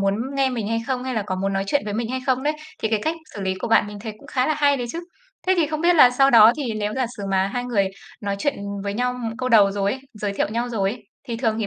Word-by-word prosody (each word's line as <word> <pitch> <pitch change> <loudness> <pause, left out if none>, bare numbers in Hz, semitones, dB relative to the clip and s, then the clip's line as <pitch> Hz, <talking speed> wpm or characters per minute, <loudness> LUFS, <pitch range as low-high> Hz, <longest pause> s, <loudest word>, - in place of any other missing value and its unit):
muốn 195 0 +2 0.2
nghe 270 -1 +2
mình 225 -4 -3
hay 230 0 0
không, 255 -1 -2
hay 260 -1 -3
là 220 - 0
có 185 - -2
muốn 195 +1 -1
nói 195 0 -1
chuyện 285 +8 +1
với 205 - -4
mình 225 +1 -2
hay 260 0 -2
không 260 0 +1
đấy. 300 - +1 0.3
Thì 220 - +1
cái 220 -1 +1
cách 320 +1 0 0.2
xử 200 - -6
lý 190 0 0
của 205 - -5
bạn 225 -2 +4
mình 205 0 -8
thấy 220 0 -5
cũng - - -16
khá 255 0 0
là 310 - +1
hay 285 -1 +3
đấy 245 - -3
chứ. 335 - -4 0.5
Thế 375 - +4
thì 330 - +3
không 310 +1 -3
biết 345 +1 +4
là 255 -5 +8
sau 270 +2 +4
đó 225 -2 +8
thì 265 -6 -2
nếu 210 0 -2
giả 260 -2 0
sử 205 - -7
mà 190 0 +2
hai 245 - -1
người 205 -6 +1 0.3
nói 200 -1 -2
chuyện 285 +6 0 0.3
với 200 - -2
nhau 250 +2 0 0.2
câu 255 0 -1
đầu 205 -4 +6
rồi 200 0 0
ấy, 265 - -6
giới 210 -1 -3
thiệu 200 - -1
nhau 235 +3 -2
rồi 200 -4 0
ấy, 235 0 -8 0.3
thì 230 - -2
thường 225 -2 0
thì 220 - -1
230 Hz, 315 wpm, -22 LUFS, 205-260 Hz, 0.5 s, là